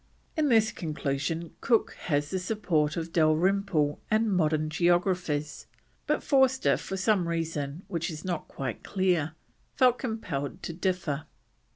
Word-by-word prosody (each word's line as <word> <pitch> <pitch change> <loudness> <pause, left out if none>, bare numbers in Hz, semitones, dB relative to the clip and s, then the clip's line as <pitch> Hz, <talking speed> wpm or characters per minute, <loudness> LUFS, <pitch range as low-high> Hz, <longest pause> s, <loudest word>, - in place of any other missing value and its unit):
In 310 -3 +2
this 225 -2 +4
conclusion 155 0 -3
Cook 230 -2 +2
has 145 -2 0
the 190 - 0
support 180 -6 0
of 165 0 -4
Dalrymple 160 -1 +2
and 215 -1 +2
modern 155 -2 +2
geographers, 175 -3 +1 0.4
but - - +1
Forster, 265 -2 +3
for 195 - -5
some 190 -2 +2
reason 165 -1 -3
which 165 +1 -2
is 155 0 -7
not 175 -4 -3
quite 130 -5 -5
clear, 175 -5 0 0.4
felt 250 -1 +4
compelled 180 - -4
to 170 - -4
differ. 165 -4 -2
170 Hz, 135 wpm, -28 LUFS, 155-195 Hz, 0.4 s, this